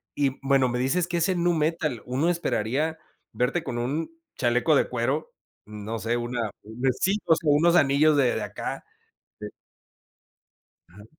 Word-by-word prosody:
y, 140 -2 0
bueno, 135 -2 +3
me 125 - -2
dices 170 +7 +1
que 175 - -1
es 170 - +2
en 180 -2 0
nu 175 - +3
metal, 155 -5 -1
uno 135 +7 0
esperaría 160 -1 -1 0.3
verte 135 +7 0
con 125 -3 -4
un 145 - -2 0.3
chaleco 125 +5 +2
de - - +2
cuero, 130 +5 -2 0.3
no 105 +2 -6
sé, 115 +2 -1
una 120 -3 -2
una 120 +5 -2
sí, 195 +2 +2
pues, 165 - +4
con 150 -3 +2
unos 170 +3 +4
anillos 145 0 +4
de 130 -4 +3
de - - -2
acá, - - -5 0.6
de - - -5 1.4
Ajá. 105 +4 -15
135 Hz, 165 wpm, -25 LUFS, 120-160 Hz, 1.4 s, pues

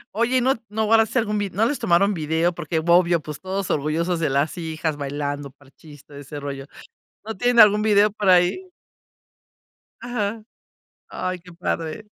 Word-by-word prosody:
Oye, 235 +3 +1
¿y - - +2
no 265 +2 +2
no 220 +1 -1
guardaste 225 +3 +3
algún 210 -1 -1
vi? 205 -1 -2
¿No 210 +5 0
les 280 +4 -1
tomaron 195 +4 +2
video 160 +2 0
porque, 165 -1 -3
obvio, 170 +1 +3
pues 150 -1 -8
todos 190 0 -4
orgullosos 160 +4 -1
de 155 - 0
las 140 +5 0
hijas 160 -2 -3
bailando 145 0 -4
Parchís, 145 +2 -18
todo 145 - -14
ese 145 +1 -8
rollo? 140 -1 -6 0.6
¿No 220 - -5
tienen 245 +2 +2
algún 210 0 +7
video 210 -1 +4
por 205 -2 -1
ahí? 180 - +3 1.3
Ajá. 225 -3 -3 0.6
Ay, 185 0 -4
qué 180 0 -15
padre. 165 +2 -4
180 Hz, 165 wpm, -22 LUFS, 155-210 Hz, 1.3 s, algún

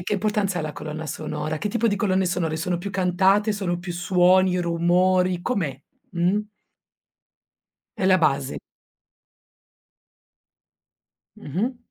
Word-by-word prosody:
che 205 - -4
importanza 200 -2 0
ha 160 - -2
la 155 - -4
colonna 155 +1 -6
sonora? 155 +1 -4
Che 185 - -2
tipo 230 +2 0
di 205 - 0
colonne 190 -2 +1
sonore, 170 -3 -1
sono 175 +1 -2
più 200 +3 -5
cantate, 195 +3 +2
sono 180 -4 -2
più 175 0 -6
suoni, 180 +1 +3
rumori? 180 +1 +2
Com'è, 165 - -2 0.3
mh? 180 +4 +1 1.6
È - - -2
la 185 0 +5
base. 140 -5 0 2.8
Mh-mh. 210 - -3
180 Hz, 120 wpm, -23 LUFS, 170-195 Hz, 2.8 s, la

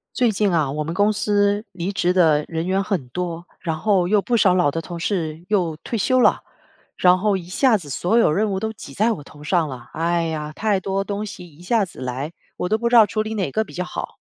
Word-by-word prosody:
最 245 -2 +3
近 205 -2 +1
啊， 155 -4 +2
我 150 +2 -2
们 165 +2 -4
公 205 +3 +3
司 205 0 +1
离 185 +2 -4
职 180 -1 +1
的 160 -5 +4
人 165 +1 -3
员 195 +1 +1
很 185 - -2
多， 175 +1 -4
然 160 -3 -2
后 190 -2 +2
又 210 0 +4
不 240 - 0
少 195 -5 +4
老 180 -5 +3
的 165 +3 -3
同 170 +1 -7
事 165 -3 -2
又 180 -7 0
退 230 - -2
休 255 +5 +2
了， - - +4 0.6
然 180 0 +5
后 200 +1 +1
一 180 - -7
下 220 +6 +3
子 160 -7 -11
所 175 - +1
有 235 - +5
任 205 +7 +1
务 190 - -1
都 220 +2 -3
挤 145 -9 -11
在 220 +8 +2
我 150 - -8
头 145 +1 -15
上 160 0 +1
了。 125 -3 -9
哎 170 +1 0
呀， 155 -2 -3
太 205 +1 0
多 195 +1 -1
东 205 +1 -3
西 180 -3 -9
一 160 0 -18
下 210 +3 +1
子 175 - -12
来， 130 +5 -4 0.2
我 - - -2
都 220 - +2
不 235 +1 0
知 240 - +3
道 225 -2 +9
处 215 +1 -2
理 215 +1 -3
哪 190 -8 -1
个 220 - +1
比 - - -14
较 180 - -3
好。 - - -6
185 Hz, 275 characters per minute, -22 LUFS, 165-210 Hz, 0.6 s, 道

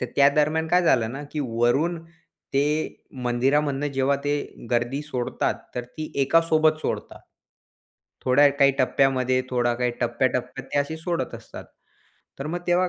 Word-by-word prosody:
तर 125 - -1
त्या 140 0 +7
दरम्यान 155 +2 +2
काय 180 +1 +4
झालं 115 -8 +3
ना, 140 - -6
की 150 - -2
वरून 120 +9 +1 0.6
ते 150 +3 0 0.2
मंदिरामधनं 135 +4 +1
जेव्हा 135 +1 +2
ते 145 0 +1 0.4
गर्दी 120 +3 0
सोडतात, 130 -5 -2 0.2
तर 125 -1 -3
ती 155 +5 -8
एकासोबत 155 +1 +3
सोडतात, - - -4 1.0
थोड्या 140 +3 +6
काही 140 0 +5
टप्प्यामध्ये, 130 -1 +2
थोडा 120 -1 +1
काही 125 0 0
टप्प्या-टप्प्यात 125 +1 -1
ते - - +2
अशी 160 +3 -3
सोडत 170 +1 -3
असतात. - - -10 0.7
तर 135 - -4
मग 175 +2 -3
तेव्हा 180 +1 +3
140 Hz, 145 wpm, -24 LUFS, 125-155 Hz, 1.0 s, त्या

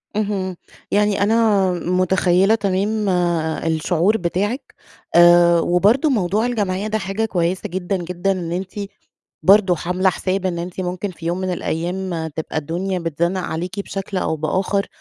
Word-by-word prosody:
اهم، 200 -3 -1 0.4
يعني 205 -1 +2
أنا 210 -3 +3
متخيلة 185 +3 +2
تمام 205 +1 0 0.6
الشعور 165 +5 +1
بتاعِك، 205 +8 -2 0.4
آآ، 175 0 +7
وبرضو 205 - +3
موضوع 210 -3 +1
الجمعية 205 -4 -1
ده 215 0 0
حاجة 195 +2 -2
كويسة 180 -3 -1
جدًا، 185 +2 -2
جدًا، 180 +2 -2
إن 175 -3 -3
أنتِ 185 +2 -3 0.7
برضو 195 -1 +5
حاملة 180 +3 0
حساب 190 +1 -2
إن 175 -2 -2
أنت 175 +2 -5
ممكن 185 +2 -3
في 165 -2 -10
يوم 175 +2 -1
من 185 0 -2
الأيام 175 0 -3
تبقى 160 0 -3
الدنيا 180 +5 -2
بتزنّق 170 +2 -1
عليكِ 180 +3 -4
بشكل 195 0 -5
أو 170 -3 0
بآخر، 190 +6 -1
185 Hz, 140 wpm, -20 LUFS, 175-200 Hz, 0.7 s, آآ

